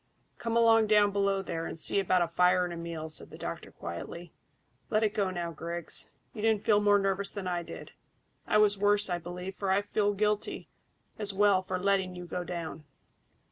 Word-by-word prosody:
"Come 230 0 -1
along 225 -1 +5
down 210 -1 +4
below 200 -1 +1
there, 165 -3 -4
and - - -7
see 200 - +3
about 185 -2 +2
a - - -1
fire 180 +2 +3
and 175 - -5
a - - -5
meal," 165 -1 -5
said 155 - -5
the - - -11
doctor - - -6
quietly. 160 - -8 0.6
"Let 215 0 +2
it 215 -1 +1
go 200 -3 0
now, 175 -2 -4
Griggs. 170 +1 -1 0.2
You 215 - -6
didn't 220 -2 +2
feel 210 -1 +4
more 205 0 +5
nervous 195 0 0
than 200 -3 -6
I 175 -1 -1
did. 170 - -9 0.6
I - - +3
was 205 -1 +4
worse, 205 -1 +3
I 175 - 0
believe, 180 +2 -6
for 195 0 -3
I 195 +2 +2
felt 205 0 0
guilty 210 0 -1 0.5
as 205 -2 -2
well 200 -1 +4
for 185 0 -3
letting 190 -1 0
you 180 0 -7
go 180 +1 -4
down. 170 -3 -6
195 Hz, 205 wpm, -29 LUFS, 175-205 Hz, 0.6 s, along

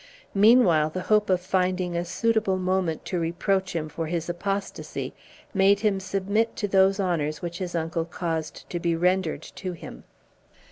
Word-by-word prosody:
Meanwhile 200 -7 +5
the 185 +3 -4
hope 210 -1 +3
of 185 -1 +3
finding 185 -1 0
a 170 - 0
suitable 215 +1 +1
moment 185 -3 -1
to 180 - -2
reproach 180 +3 0
him 155 -2 -1
for 160 +1 -4
his 165 0 -2
apostasy 195 +3 -3 0.4
made 200 0 +4
him 205 -3 +2
submit 200 +4 0
to 205 - -2
those 195 0 +4
honors 160 -5 -1
which 170 0 -4
his 180 -2 -4
uncle 165 0 -1
caused 165 -2 -4
to 175 - -2
be 170 -1 +1
rendered 175 -3 +1
to 185 -2 -6
him. 170 - -10
185 Hz, 160 wpm, -26 LUFS, 170-195 Hz, 0.4 s, Meanwhile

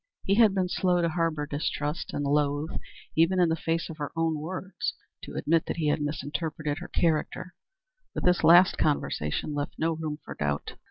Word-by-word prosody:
He 195 - +1
had 215 -2 +5
been 185 -1 +1
slow 180 0 +1
to 170 -1 +2
harbor 165 -3 0
distrust, 150 +2 -3
and 145 - -2
loath, 145 +2 +1 0.4
even 165 +4 +3
in 175 -2 +4
the 160 - +2
face 165 +1 -1
of 160 - -8
her 145 -2 -4
own 165 -2 0
words, 185 +4 -4 0.3
to - - -9
admit 165 +1 +1
that - - -3
he 155 -3 +1
had 150 - +1
misinterpreted 150 +1 -3
her - - -7
character; 170 +2 0 0.6
but - - -3
this 180 -1 +3
last 175 +3 +7
conversation 145 - 0
left 145 0 -3
no 165 +1 +1
room 155 -2 -4
for - - -6
doubt. 70 -1 -2
160 Hz, 185 wpm, -27 LUFS, 150-170 Hz, 0.6 s, last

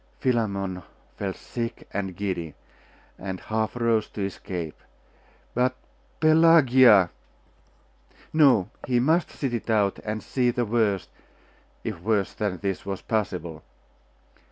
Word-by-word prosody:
Philammon 100 -7 -1 0.3
felt 95 -2 -3
sick 115 -1 -6
and 95 -2 -3
giddy, 90 -6 -3 0.6
and 95 -1 -5
half 110 +1 -2
rose 115 -2 +1
to 100 - -3
escape. 90 -4 -6 0.7
But 125 +1 +1 0.4
Pelagia!.... 130 - +6 1.2
No 135 - +4 0.2
he 125 -1 +2
must 160 +7 +2
sit 135 -4 -3
it 120 - -4
out, 105 -3 +2
and 110 0 -4
see 125 -2 +1
the 120 0 0
worst, 105 -4 0 0.7
if 85 - -5
worse 105 -1 0
than 100 -4 -2
this 95 0 -3
was 100 -1 -5
possible. 90 -7 -2
110 Hz, 115 wpm, -25 LUFS, 95-120 Hz, 1.2 s, Pelagia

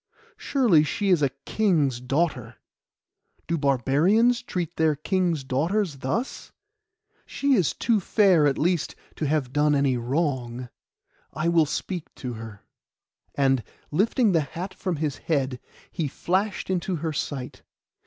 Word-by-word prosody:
Surely 225 - +3
she 200 +6 -1
is 175 -5 +4
a 140 - +3 0.2
king's 155 - +1
daughter. 130 -3 -1 0.9
Do 170 - -1
barbarians 160 - +3
treat 175 -2 -4
their 160 -2 +2
kings' 170 -1 0
daughters 155 +6 0
thus? 175 - -3 0.8
She 280 0 +1
is 185 - +2
too 230 -3 +2
fair, 185 -5 +4
at 140 - +1
least, 170 0 0 0.2
to 155 - -1
have 140 -4 -1
done 150 +1 +3
any 140 -3 +2
wrong 125 -2 -2 0.6
I 155 +2 0
will 165 -3 +4
speak 175 +2 -5
to 125 -2 -5
her.' 110 -2 -9 0.7
And, 135 -3 +2 0.3
lifting 210 - +2
the 165 -3 +3
hat 175 +6 -6
from 185 -1 -3
his 150 -2 -2
head, 135 -5 -1 0.3
he 165 -5 -2
flashed 190 +7 -1
into 185 0 -1
her 160 0 -3
sight. 135 -3 -4
155 Hz, 135 wpm, -25 LUFS, 135-185 Hz, 0.9 s, is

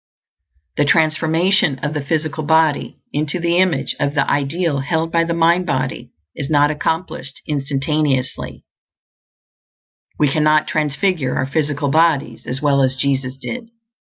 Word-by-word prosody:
The 145 - +3
transformation 160 +1 +2
of 150 0 -1
the 150 -2 -3
physical 155 +1 -2
body 160 -1 +2 0.2
into 150 +4 -1
the 170 +1 +1
image 185 -2 +1
of 145 0 -1
the 135 - +2
ideal 145 +2 0
held 160 +4 -1
by 165 0 +3
the 170 0 -2
mind 170 +2 +3
body 145 - -2 0.3
is 140 - -5
not 145 -1 +4
accomplished 160 -2 -3
instantaneously; 140 -1 -1 1.5
we 150 - +3
cannot 155 +2 +2
transfigure 150 -1 0
our 135 - 0
physical 145 0 -1
bodies 160 -2 +1
at 135 +3 -4
will 140 -1 +3
as 130 0 +1
Jesus 135 -1 -1
did. 230 - -6
150 Hz, 135 wpm, -19 LUFS, 140-165 Hz, 1.5 s, not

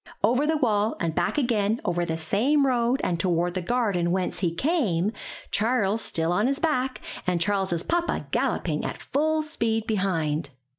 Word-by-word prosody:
Over 250 +5 +3
the 315 0 +2
wall 215 -5 +1
and 165 -1 -1
back 175 - 0
again 225 -5 +1
over 175 -2 0
the 160 -1 -2
same 240 - +2
road 250 0 +1
and 170 -2 0
toward 175 -1 +1
the 185 - -2
garden 195 -4 0
whence 180 -1 -1
he 175 -2 +1
came, 210 - +1 0.4
Charles 220 -1 +1
still 165 +1 0
on 205 +6 +2
his 275 +1 0
back 265 -5 -1 0.3
and 180 -1 +1
Charles's 190 -2 0
papa 345 0 -1
galloping - - 0
at - - -4
full 310 +2 0
speed 225 -8 -1
behind. 165 -8 -1
210 Hz, 165 wpm, -25 LUFS, 175-255 Hz, 0.4 s, Over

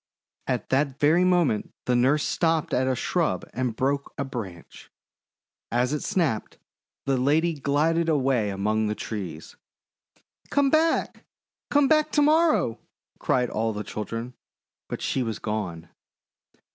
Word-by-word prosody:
At - - -2
that 135 0 +1
very 160 +5 +4
moment 175 - +1
the 125 - +2
nurse 135 +5 +3
stopped 165 -2 0
at 130 +1 +2
a 130 - +1
shrub - - -1
and 125 -3 -2
broke 140 +3 -1
a 140 - -2
branch. 100 -10 -8 0.8
As 125 +3 +1
it 150 - -1
snapped, 150 - -1 0.5
the 135 -1 +1
lady 155 +6 +2
glided 155 +4 +1
away 130 -8 +2
among 105 +3 0
the 105 - -1
trees. 90 -10 -6 0.9
"Come 280 -1 +2
back! 320 +1 +1 0.4
Come 290 -1 +4
back 305 0 +3
to 295 - +4
morrow!" 305 - +3 0.4
cried 125 -2 +1
all 110 +1 -1
the 105 0 -4
children; 115 +4 -5 0.6
but - - -5
she 135 - 0
was 115 -3 -2
gone. 90 -6 -4
130 Hz, 135 wpm, -25 LUFS, 110-165 Hz, 0.9 s, very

